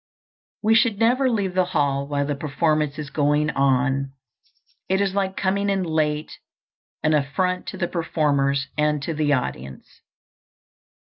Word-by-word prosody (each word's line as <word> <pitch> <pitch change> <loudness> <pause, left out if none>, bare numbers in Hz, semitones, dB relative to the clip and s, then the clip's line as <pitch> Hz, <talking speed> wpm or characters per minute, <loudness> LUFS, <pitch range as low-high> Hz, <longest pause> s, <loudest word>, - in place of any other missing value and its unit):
We 220 +1 +4
should 230 -2 +3
never 250 +4 +3
leave 200 -6 -1
the 185 0 +3
hall 140 -1 +1
while 140 -1 -1
the 145 - -1
performance 150 0 0
is 150 -2 -6
going 150 +1 +1
on. 135 0 +1 0.8
It 190 +1 +2
is, 200 -1 0
like 195 -1 -1
coming 200 +1 0
in 195 -1 +1
late, 155 -2 -1 0.6
an 155 0 +3
affront 180 +6 0
to - - -6
the 175 - -1
performers 140 -5 0
and 150 -1 +1
to 165 - -2
the 150 -1 0
audience. 65 - -5
150 Hz, 145 wpm, -23 LUFS, 140-190 Hz, 0.8 s, We